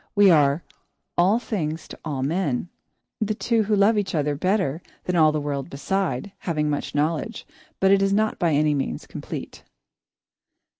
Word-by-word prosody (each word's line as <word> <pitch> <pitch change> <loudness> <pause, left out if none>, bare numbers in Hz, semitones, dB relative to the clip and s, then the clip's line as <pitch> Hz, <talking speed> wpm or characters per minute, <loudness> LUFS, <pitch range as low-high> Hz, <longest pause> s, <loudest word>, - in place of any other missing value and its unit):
We 205 -2 +7
are 145 0 +4 0.5
"all 190 +6 +4
things 165 -9 -3
to - - -10
all 140 -5 -3
men." 160 -1 -1 0.5
The 215 -1 0
two 230 +1 +1
who 210 0 +1
love 205 +2 +4
each 195 -3 -2
other 150 -1 +1
better 185 -1 0 0.2
than 180 - -1
all 155 -2 +5
the 155 - -1
world 145 0 -3
beside, 175 +2 -2
have 170 -3 -3
much 150 -1 -1
knowledge, 160 +9 -1 0.3
but 190 0 +4
it 195 0 +5
is 195 0 +2
not 215 +2 +1
by 170 -3 +2
any 150 +1 +3
means 135 - -3
complete. - - -7
170 Hz, 165 wpm, -24 LUFS, 150-200 Hz, 0.5 s, We